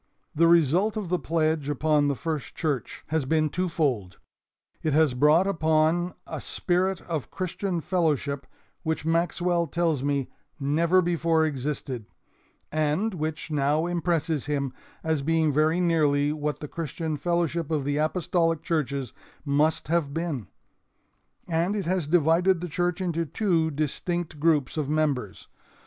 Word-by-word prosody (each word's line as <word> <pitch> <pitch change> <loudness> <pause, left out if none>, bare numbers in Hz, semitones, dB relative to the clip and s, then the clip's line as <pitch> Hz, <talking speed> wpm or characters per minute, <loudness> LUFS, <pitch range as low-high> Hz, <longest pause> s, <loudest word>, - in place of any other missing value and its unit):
"The 165 +2 +4
result 170 - +3
of 200 -5 -3
the 180 0 +1
pledge 155 -2 0
upon 150 0 +2
the 140 - +1
First 155 -2 -4
Church 145 -9 -3
has 160 -1 +1
been 155 +2 +2
two 180 +4 -1
fold. 125 - -1 0.6
It 155 - 0
has 155 -3 +4
brought 150 +8 +4
upon 165 -1 +1
a - - -6
spirit 185 +1 0
of 160 -5 -4
Christian 185 -1 -3
fellowship 150 -6 0 0.3
which 160 -2 -2
Maxwell 170 +1 +1
tells 165 -3 0
me 140 -1 -1 0.3
never 165 +6 +3
before 165 -2 +2
existed, 135 -5 -3 0.6
and 155 +8 0
which 155 -1 -4
now 150 +2 +1
impresses 165 -4 -1
him 140 -3 -1 0.3
as 160 -3 0
being 160 0 +2
very 155 +4 +3
nearly 150 -4 +2
what 150 -1 -3
the 150 - -5
Christian 160 0 -4
fellowship 170 0 -1
of 155 -3 0
the 145 +1 -1
apostolic 165 0 +1
churches 140 -7 -2 0.3
must 145 +2 +1
have 155 -3 0
been; 160 - -3 1.0
and 170 +4 0
it 200 - -2
has 180 -3 0
divided 170 +3 +3
the 180 - -4
church 175 +3 -1
into 170 -2 0
two 165 -1 +1
distinct 155 +2 -3
groups 150 -3 +2
of 145 -2 -1
members. 145 -9 -1
160 Hz, 140 wpm, -26 LUFS, 145-170 Hz, 1.0 s, The